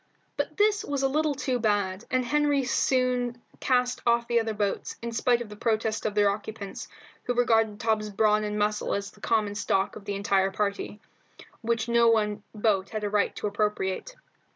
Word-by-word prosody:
But - - -3
this 415 0 +3
was 280 -7 -2
a - - +4
little 300 +1 0
too 260 -2 -1
bad, 205 -2 0
and 255 -1 +1
Henry 290 0 +2
soon 250 -2 +1 0.2
cast 250 -1 +1
off 235 0 +2
the 235 -1 +3
other 225 -1 -2
boats, 205 -1 -2
in 235 - -3
spite 240 +1 +2
of 220 - -13
the 210 - -9
protests 220 0 0
of 210 - -4
their 205 -1 +4
occupants, 205 0 -6 0.4
who 245 - -1
regarded 225 -3 +2
Tom's 215 -1 0
brawn 210 +1 +2
and 210 0 -2
muscle 210 0 0
as 200 0 -4
the 210 - -21
common 215 -3 +1
stock 195 -1 0
of 205 - -10
the 205 -1 -3
entire 195 -1 +2
party, 200 +1 -3 0.6
which 230 0 -1
no 235 0 +4
one 210 -2 +1
boat 205 -3 +1
had 215 -1 -4
a 205 - -2
right 210 -1 +1
to - - -5
appropriate. 210 - -1
220 Hz, 190 wpm, -27 LUFS, 205-245 Hz, 0.6 s, a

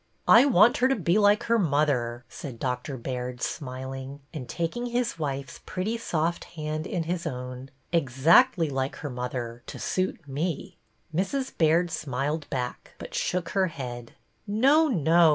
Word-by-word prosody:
I 235 +5 +8
want 235 -2 +6
her 255 - +4
to 270 - +2
be 180 0 +2
like 205 0 +4
her 230 0 +2
mother," 140 - +1
said 130 -5 -8
Doctor 125 +2 -3
Baird, 125 0 -4
smiling, 130 +1 -5
and 130 -7 -6
taking 170 - -2
his 240 -6 -1
wife's 135 -3 -4
pretty 190 +5 -2
soft 170 -5 -1
hand 155 +1 -4
in 175 -3 -1
his 170 +1 -2
own, 125 +1 -6
— - - -39
exactly 165 - +4
like 135 -1 -2
her 145 - -6
mother, 125 -1 -4
to - - -7
suit 185 -4 -2
me." 160 +6 -3 0.4
Mrs. 260 - -1
Baird 165 +2 +3
smiled 145 +2 -2
back, 125 -2 -4
but - - -9
shook 180 -2 -1
her 190 -2 +2
head. 120 -6 -7 0.3
No, 275 +10 +4
no 170 - +5
155 Hz, 155 wpm, -27 LUFS, 130-185 Hz, 0.4 s, I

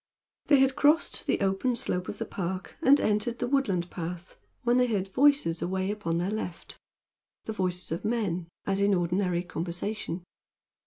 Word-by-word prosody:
They 285 - +6
had 265 0 +3
crossed 300 +3 +3
the - - +2
open 195 +6 +1
slope 180 -5 -2
of 205 - -5
the - - -3
park 185 0 -4
and 280 +2 +6
entered 215 +3 0
the - - -1
woodland 205 -11 0
path 175 +1 -6 0.3
when 240 0 +3
they 250 0 +4
heard 200 -5 -1
voices 265 - +3
away 190 +2 -1
upon 185 -6 -2
their 180 +4 -1
left 195 -5 -5 0.7
the 220 - -3
voices 180 -4 -2
of 165 - -3
men, 205 -7 -1 0.2
as 195 0 0
in 200 0 +3
ordinary 180 0 0
conversation. 175 +1 -4
195 Hz, 165 wpm, -28 LUFS, 175-235 Hz, 0.7 s, They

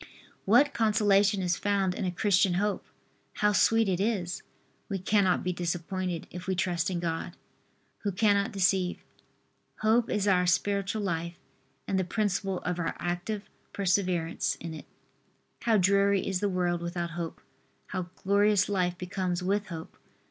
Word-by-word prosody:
What 260 +8 +5
consolation 205 -3 +3
is 175 -1 +1
found 195 -2 +1
in 190 - -3
a 180 - 0
Christian 185 0 +2
hope! 205 +2 0 0.5
How 210 0 +2
sweet 225 +2 +4
it 185 -2 0
is! 195 -4 -1 0.5
We 200 - -1
cannot 190 0 +2
be 180 - -1
disappointed 175 0 -3
if 180 +2 -8
we 190 - 0
trust 175 -2 0
in 180 -2 -2
God, 170 +1 -3 0.6
Who 205 - -2
cannot 200 +2 +2
deceive. 185 -2 +1 0.8
Hope 220 +2 +3
is 205 -1 0
our 180 -2 +3
spiritual 200 +3 0
life 170 -2 -2 0.5
and 190 - +1
the - - +1
principle 195 -1 -1
of 180 -1 -2
our 165 - -2
active 180 +4 -3 0.3
perseverance 180 -4 0
in 165 -1 -7
it. 155 - -9 0.8
How 225 -2 +4
dreary 200 +1 +3
is 190 -2 -1
the 205 +1 0
world 175 -2 0
without 170 0 -3
hope! 170 -1 -5 0.5
How 180 -1 -4
glorious 200 0 +3
life 180 -3 0
becomes 180 0 -2
with 200 +3 0
hope! 165 -4 -8
190 Hz, 150 wpm, -28 LUFS, 175-205 Hz, 0.8 s, What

